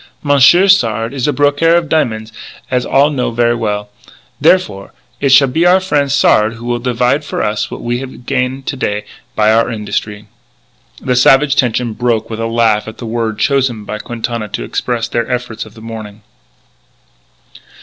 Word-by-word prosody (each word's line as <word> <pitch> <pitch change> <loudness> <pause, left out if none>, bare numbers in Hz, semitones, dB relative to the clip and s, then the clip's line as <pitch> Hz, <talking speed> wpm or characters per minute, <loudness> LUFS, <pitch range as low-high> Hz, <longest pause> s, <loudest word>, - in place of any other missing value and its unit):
Monsieur 145 +6 +5
Sard 115 - +2
is 135 -1 -2
a - - +2
brokaire 145 +4 +2
of 170 -1 +1
diamon's, 110 -8 -1 0.4
as 125 -1 0
all 140 +2 +3
know 130 -4 -1
ver' 120 0 +1
well. 105 -2 -3 0.5
Therefore, 100 - +1 0.3
it 140 - +1
shall 135 +1 +6
be 160 +7 0
our 180 +2 +5
frien' 150 -7 0
Sard 110 -5 +3
who 115 +1 -11
will 120 0 -1
divide 125 +4 0
for - - -3
us 105 0 -2
what - - -8
we 120 +1 -2
have 130 -2 -9
gain 130 0 -2
to 135 - -4
day 105 -5 -3 0.3
by 110 0 +3
our 115 +1 +2
industry." 105 -1 -4 0.7
The 125 - -1
savage 135 +3 +4
tension 120 -3 0
broke 115 -1 -1
with 110 - -5
a 115 - -1
laugh 115 -2 +1
at 110 - -9
the 120 - -8
word 115 -1 -2
chosen 125 -2 0
by 105 - -5
Quintana 115 -1 -4
to 105 - -5
express 120 -2 -2
their 120 +1 -2
efforts 120 -3 -4
of 105 - -17
the 110 - -13
morning. 110 -2 -9
120 Hz, 180 wpm, -14 LUFS, 110-135 Hz, 0.7 s, shall